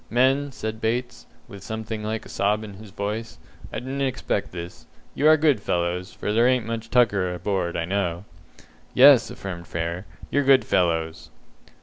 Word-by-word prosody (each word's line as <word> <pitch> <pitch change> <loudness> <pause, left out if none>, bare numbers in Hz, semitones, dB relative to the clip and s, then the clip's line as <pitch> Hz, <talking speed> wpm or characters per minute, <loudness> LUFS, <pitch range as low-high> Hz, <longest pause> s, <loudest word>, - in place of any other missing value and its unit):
"Men," 135 +4 +2
said 110 -2 -5
Bates, 120 +2 -2 0.2
with 100 -4 -11
something 110 +1 -5
like 110 +1 -3
a - - -12
sob 105 +2 0
in 105 -2 -8
his 105 +2 -12
voice, 105 +3 -4 0.3
"I - - -4
didn't 135 +3 -4
expect 135 -2 -1
this. 85 0 -8 0.3
You 150 - +2
are 155 0 +7
good 145 -8 +3
fellows, 90 +2 -1
for 105 - -3
there 115 +3 +4
ain't 125 -3 +2
much 115 0 -5
tucker 105 -7 +3
aboard, 90 0 -2
I 80 - -1
know." 90 -1 -2 0.7
"Yes," 135 -1 +7
affirmed 85 -3 -7
Frere, 85 +3 -4 0.2
"you're 145 - +3
good 135 -4 +5
fellows." 80 -3 0
110 Hz, 165 wpm, -24 LUFS, 90-125 Hz, 0.7 s, are